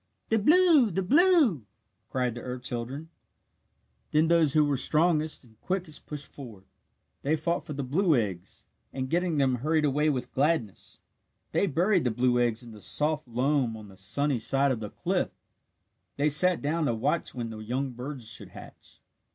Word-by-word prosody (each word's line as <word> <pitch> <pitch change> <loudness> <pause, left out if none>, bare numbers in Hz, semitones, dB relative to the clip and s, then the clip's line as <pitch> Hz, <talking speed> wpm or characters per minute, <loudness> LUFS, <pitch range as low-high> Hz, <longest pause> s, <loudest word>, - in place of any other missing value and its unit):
"The 225 - +2
blue 310 - +5
the 190 +1 -2
blue!" 285 - +4 0.4
cried 125 -2 -1
the 120 - -8
earth 125 0 -6
children. 130 +6 -5 1.0
Then 155 +2 +2
those 165 -4 +3
who 155 -1 +4
were 145 -1 0
strongest 155 +2 +2
and 110 -3 -23
quickest 180 -5 -4
pushed 150 -2 -6
forward. 115 -9 -11 0.6
They 150 +3 +1
fought 170 +3 -2
for 155 - -7
the 140 0 -4
blue 160 +5 +2
eggs, 95 -6 -3 0.3
and 130 -1 -5
getting 175 -1 0
them 130 -3 +2
hurried 155 +4 +1
away 150 +2 +1
with 125 -3 -3
gladness. 135 - -1 0.5
They 200 - +1
buried 180 +4 +2
the 125 - +1
blue 125 +1 +1
eggs 120 0 0
in 120 - -11
the 105 -1 -13
soft 145 - 0
loam 125 -1 0
on 105 -2 -12
the 95 - -15
sunny 135 +8 0
side 135 +4 +3
of 120 - -2
the 105 -2 -6
cliff. - - -1 0.9
They 145 +2 +2
sat 180 +4 +4
down 155 +1 0
to 115 - 0
watch 145 +8 -1
when 115 -2 -4
the 110 - -8
young 125 +5 -3
birds 125 0 -7
should 115 - -5
hatch. - - -14
140 Hz, 175 wpm, -27 LUFS, 120-160 Hz, 1.0 s, blue